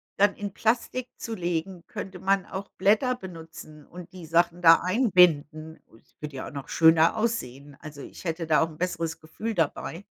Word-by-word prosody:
dann 200 Hz, 0 st, +3 dB
in 205 Hz, -1 st, -6 dB
Plastik 240 Hz, +3 st, -1 dB
zu 230 Hz, -, -6 dB
legen, 175 Hz, -1 st, -3 dB
könnte 190 Hz, -1 st, -7 dB
man 195 Hz, 0 st, +1 dB
auch 195 Hz, +1 st, -7 dB
Blätter 215 Hz, +7 st, +2 dB
benutzen 165 Hz, -6 st, -11 dB
und 180 Hz, +1 st, -12 dB
die 180 Hz, -3 st, -10 dB
Sachen 170 Hz, +2 st, +1 dB
da 165 Hz, -1 st, +7 dB
einbinden. 175 Hz, -, +2 dB
Und 115 Hz, -, -22 dB, 0.2 s
würde 150 Hz, -2 st, -7 dB
ja 130 Hz, -, -6 dB
auch -, -, -9 dB
noch 140 Hz, -2 st, -8 dB
schöner 160 Hz, +4 st, +4 dB
aussehen, 145 Hz, -, -3 dB
also, 150 Hz, -2 st, -10 dB
ich -, -, -12 dB
hätte 165 Hz, 0 st, -3 dB
da 155 Hz, -1 st, +3 dB
auch 165 Hz, -, +1 dB
'n 155 Hz, -, -14 dB
besseres 165 Hz, -2 st, -3 dB
Gefühl 215 Hz, +8 st, -6 dB
dabei. 165 Hz, +3 st, -2 dB
175 Hz, 185 wpm, -26 LUFS, 160-195 Hz, 0.2 s, da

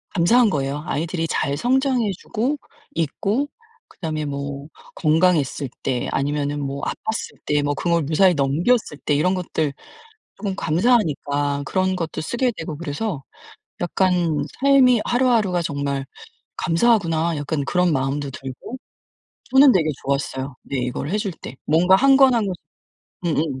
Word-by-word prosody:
감사한 220 Hz, +6 st, +4 dB
거예요. 145 Hz, -1 st, -2 dB
아이들이 165 Hz, +2 st, -2 dB
잘 140 Hz, -3 st, -1 dB
성장해 255 Hz, -, +1 dB
주고 255 Hz, +7 st, -2 dB, 0.4 s
있고 200 Hz, -, -1 dB, 0.4 s
그다음에 155 Hz, -4 st, -4 dB
뭐 140 Hz, 0 st, -5 dB, 0.3 s
건강했을 155 Hz, -4 st, +2 dB
때 125 Hz, -2 st, -1 dB
아니면은 145 Hz, +1 st, -1 dB
뭐 140 Hz, 0 st, -4 dB
아팠을 220 Hz, +1 st, -4 dB
때 150 Hz, 0 st, +1 dB
뭐 145 Hz, 0 st, 0 dB
그걸 170 Hz, +2 st, 0 dB
무사히 175 Hz, +5 st, +4 dB
넘겼을 150 Hz, -, +1 dB
때 -, -, +2 dB
이런 180 Hz, +6 st, +2 dB
것들 160 Hz, -5 st, -1 dB, 0.6 s
쪼금 195 Hz, -3 st, -4 dB
감사하니까 155 Hz, -, +1 dB
그런 185 Hz, +2 st, 0 dB
것도 165 Hz, -2 st, -4 dB
쓰게 240 Hz, +8 st, 0 dB
되고 160 Hz, -2 st, -5 dB
그래서 155 Hz, 0 st, -4 dB, 0.6 s
약간 175 Hz, -3 st, +1 dB, 0.2 s
'삶이 265 Hz, -4 st, +5 dB
하루하루가 230 Hz, -8 st, +2 dB
정말 140 Hz, -2 st, -2 dB, 0.5 s
감사하구나.' 170 Hz, -4 st, +2 dB
약간 145 Hz, 0 st, -2 dB
그런 180 Hz, +2 st, +2 dB
마음도 135 Hz, +1 st, -1 dB
들고 135 Hz, -, -8 dB, 0.8 s
저는 270 Hz, 0 st, +8 dB
되게 155 Hz, -4 st, +2 dB
좋았어요, 135 Hz, -1 st, -2 dB
네 140 Hz, -, -4 dB
이거를 125 Hz, +4 st, -3 dB
해줄 205 Hz, -3 st, -1 dB
때. 130 Hz, -, -8 dB
뭔가 180 Hz, +5 st, +5 dB
1 275 Hz, +3 st, +5 dB
권 270 Hz, -2 st, +6 dB
1 225 Hz, -3 st, +2 dB
권 185 Hz, -, -2 dB, 0.7 s
음음. 150 Hz, -5 st, -1 dB
165 Hz, 290 characters per minute, -22 LUFS, 145-205 Hz, 0.8 s, 저는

